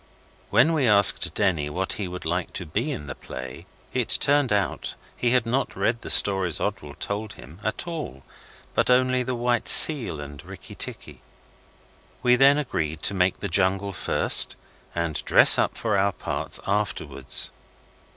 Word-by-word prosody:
When 125 +10 +3
we 145 -6 0
asked 100 -3 +5
Denny 85 -8 -1
what 95 +5 -3
he 100 -3 -5
would 90 -1 -9
like 90 +2 -3
to 90 - -6
be 110 - -3
in 75 - -7
the 70 - -7
play, 65 -1 -10 0.3
it - - 0
turned 145 -3 +1
out 100 -1 -2 0.2
he 120 - -1
had 125 -1 +1
not 125 +4 -2
read 115 +1 -2
the - - -8
stories 95 -4 +3
Oswald 75 -1 -6
told 105 0 -5
him 75 +7 -15
at 110 - -4
all, 155 - -7 0.5
but - - 0
only 130 0 +2
the 125 0 -4
'White 120 0 -1
Seal' 125 - +6
and 70 -1 -10
'Rikki - - -12
Tikki'. - - -7 1.0
We 125 0 +4
then 135 +3 +4
agreed 80 - -4
to - - 0
make 95 -1 -1
the 100 - -3
jungle 95 +2 0
first - - +1 0.4
and 85 -3 -3
dress - - +7
up - - -1
for 110 -3 -2
our 100 0 0
parts - - -4
afterwards. 105 +1 -3
100 Hz, 165 wpm, -23 LUFS, 85-125 Hz, 1.0 s, dress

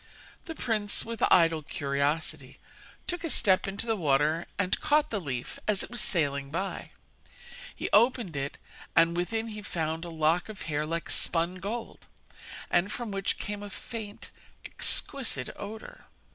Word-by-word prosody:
The 325 - -6
prince, 215 -6 +1
with 230 -1 -5
idle 165 -2 +5
curiosity, 145 0 -1 0.5
took 350 -1 -4
a 330 - -1
step 195 -9 +4
into 200 +3 -3
the 225 -1 +1
water 155 -1 +2
and 190 -2 +1
caught 300 +1 +3
the 205 -3 -1
leaf 130 -6 -4
as 210 -2 +2
it - - -9
was 240 -2 +1
sailing 140 -5 +1
by. 190 +6 -3 0.9
He - - -3
opened 230 - +4
it, 140 0 -3 0.4
and 165 +1 +5
within 225 +6 -1
he 210 -1 -6
found 160 -3 -2
a 175 - -6
lock 165 +3 +1
of 210 -3 -7
hair 150 -1 -1
like 165 +1 -2
spun 170 +2 +1
gold, 220 +5 -5 0.6
and 190 +4 +3
from 235 -2 -4
which 195 0 -1
came 205 -1 -4
a 205 - -6
faint, 215 0 -7 0.3
exquisite 225 - +1
odour. 215 +2 -9
185 Hz, 155 wpm, -29 LUFS, 155-215 Hz, 0.9 s, idle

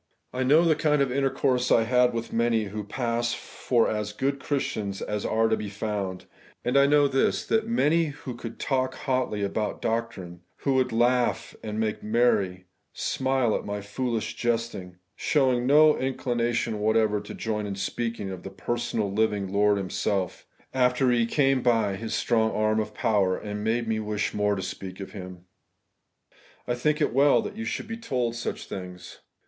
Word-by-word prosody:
I 130 - -2
know 150 +6 +5
the 165 - +5
kind 150 -1 +2
of 135 - -2
intercourse 130 -1 +1
I 115 - +5
had 125 +1 +3
with 115 0 -5
many 115 -1 +2
who 105 +1 -5
pass 120 +1 -1
for 120 -1 0
as 105 -1 -2
good 140 +5 -1
Christians 110 -9 -2
as 105 -1 -3
are 115 +1 +2
to 110 - +2
be 105 -2 -5
found; 100 -3 -4 0.4
and 125 +2 0
I 140 0 +6
know 145 0 +5
this, 135 -1 +1
that 220 -1 +1
very 230 - -3
many 165 -2 +3
who 145 -4 -6
could 115 -1 -8
talk 130 -1 -1
hotly 130 -6 -1
about 105 +2 -2
doctrine, 110 -7 -3
who 140 - -1
would 130 -1 +2
laugh 120 +2 +1
and 110 0 -4
make 110 -1 -1
merry, 105 -5 +1 0.3
smUe 130 -4 0
at - - -9
my 105 0 -4
foolish 110 +3 -3
jesting, 115 -6 -2 0.2
showed 130 -2 +2
no 150 +4 +6
inclination 120 -4 -1
whatever 110 -1 +2
to 105 - -9
join 105 -2 -2
in 100 - -4
sjieaking 100 0 -3
of 90 - -8
the 95 - -7
personal 110 +1 -2
living 105 -2 0
Lord 105 0 +3
Himself, 95 0 -2 0.3
after 125 0 +3
He 120 -1 +2
came 135 0 +2
by 115 -5 +2
His 110 +3 -4
strong 110 -2 +2
arm 110 0 +1
of 105 0 -3
power, 100 -4 +2
and 105 0 -5
made 115 +1 0
me 110 -1 0
wish 105 -1 -2
more 105 0 +1
to 95 - -4
speak 95 0 -6
of 95 - -7
Him. 90 -3 -9 1.2
I 120 - +1
think 150 +6 0
it 145 - +3
is - - -10
weU 140 +2 +4
that - - -6
you 225 +1 -5
should - - -3
be 225 0 -5
told 125 - -1
such 120 0 -4
things. 90 -1 -8
115 Hz, 180 wpm, -26 LUFS, 105-130 Hz, 1.2 s, I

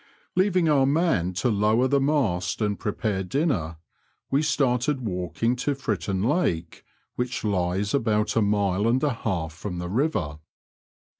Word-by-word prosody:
Leaving 185 -2 +3
our 140 -3 +4
man 140 - +2
to 95 +8 -1
lower 110 +4 +2
the 140 +1 +2
mast 125 -12 0
and 105 -2 -1
prepare 105 -2 -2
dinner, 90 - -1 0.5
we 140 +2 +3
started 135 -2 +1
walking 105 +3 -1
to 140 +3 -1
Fritton 100 -7 -2
Lake, 105 - -1 0.3
which 125 +1 -2
hes 95 0 0
about 110 -5 +1
a 115 - +3
mile 100 -1 +1
and 125 +4 +2
a 145 -3 +2
half 90 -9 -3
from 90 +2 -6
the 90 0 -4
river. 95 - -1
110 Hz, 145 wpm, -25 LUFS, 95-135 Hz, 0.5 s, our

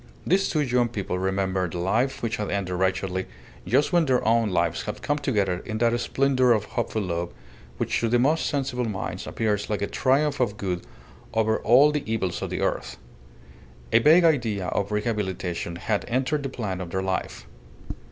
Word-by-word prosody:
These 195 +3 +2
two 155 - +1
young 125 -3 +1
people 100 -5 -3
remembered 95 -2 -1
the - - -3
life 110 +11 0
which 115 0 -1
had 105 - -3
ended 100 -2 -2
wretchedly 95 0 -1 0.4
just 150 +5 +2
when 170 -2 +4
their 125 -4 +2
own 115 -1 +3
lives 85 -2 0
had 105 - -6
come 145 0 0
together 100 -10 0
in 110 - -4
that 120 +1 +2
splendour 130 +1 +3
of 105 -2 0
hopeful 110 0 -2
love, 85 -1 -3 0.5
which - - 0
to 115 - 0
the 120 - +3
most 145 +7 +2
sensible 135 -4 -1
minds 95 -4 -4
appears 105 -2 -1
like 105 -2 -1
a - - +2
triumph 140 +6 +1
of 110 -5 0
good 90 -4 -2 0.5
over 110 0 +2
all 135 +6 +5
the 150 -1 -1
evils 95 -6 -1
of - - -3
the - - -3
earth. - - -2 1.0
A - - +7
vague 160 +8 +6
idea 115 - +1
of 100 +1 -1
rehabilitation 95 -6 -2
had 105 +4 -1
entered 130 +5 0
the 135 - -3
plan 100 -8 -4
of 90 - -6
their 95 +2 -2
life. 95 -1 -3
110 Hz, 185 wpm, -25 LUFS, 95-130 Hz, 1.0 s, A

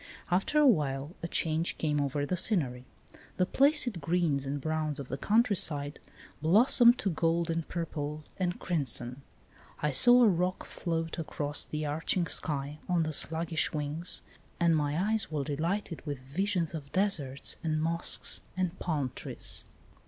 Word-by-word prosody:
After 190 +11 +1
a 300 - +6
while 145 - +1
a 170 - -3
change 165 0 0
came 150 -2 0
over 145 +1 -1
the 180 - -1
scenery. 140 - +2 0.5
The 180 - +3
placid 265 - +2
greens 150 -3 0
and 145 +1 -2
browns 155 0 -1
of 135 - -7
the - - -2
countryside 175 -10 +2 0.4
blos 200 - +4
somed 240 0 +7
to 195 - -1
gold 165 +1 0
and 165 -1 -2
purple 155 -3 -4
and 180 -1 -2
crimson. 130 -5 -1 0.6
I 150 - 0
saw 245 - +6
a - - +7
roc 180 -1 0
float 165 -1 -3
across 150 -2 -1
the 155 0 -4
arching 160 +4 -1
sky 145 -2 -2
on 170 -2 +2
sluggish 160 +2 +1
wings, 155 +4 -3 0.4
and 170 -1 +4
my 150 0 0
eyes 220 -1 +1
were 150 -2 -1
delighted 165 +5 -3
with 145 -2 -4
visions 170 +5 -1
of 145 -3 -7
deserts 160 -9 -1
and 155 -1 0
mosques 165 +2 0 0.2
and 185 -1 -2
palm 145 -7 -1
trees. - - -4
160 Hz, 150 wpm, -30 LUFS, 145-180 Hz, 0.6 s, somed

